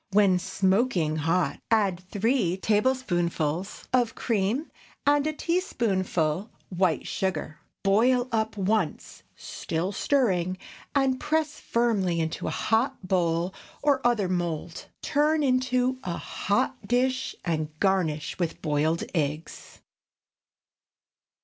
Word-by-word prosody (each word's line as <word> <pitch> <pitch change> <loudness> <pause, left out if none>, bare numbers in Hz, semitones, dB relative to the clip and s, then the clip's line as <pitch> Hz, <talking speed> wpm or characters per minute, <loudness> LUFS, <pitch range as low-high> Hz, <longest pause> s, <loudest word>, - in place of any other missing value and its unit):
When 195 -3 +5
smoking 190 -5 +1
hot, 165 +4 0
add 200 -6 +2
three 205 -4 +1
tablespoonfuls 190 - 0
of 245 -3 +2
cream 225 +6 -1 0.3
and 290 +1 +3
a - - +1
teaspoonful 200 - 0 0.2
white 180 -3 +1
sugar. 165 -5 -3 0.2
Boil 245 +6 +3
up 220 -1 -1
once, 200 -3 -1
still 165 +4 -3
stirring, 185 -8 +1 0.4
and 265 -2 +2
press 310 0 -1
firmly 205 -8 +1
into 160 0 -2
a - - +1
hot 225 -2 0
bowl 175 -1 +1 0.3
or 285 -2 +3
other 235 -5 +2
mould. 175 -2 -3 0.2
Turn 300 +1 +2
into 255 -1 +1
a 175 -2 -3
hot 250 +1 -1
dish 255 +2 +1
and 155 -3 -1
garnish 160 -7 0
with 170 -3 -2
boiled 155 +1 0
eggs. 155 -1 -3
195 Hz, 105 wpm, -27 LUFS, 175-255 Hz, 0.4 s, When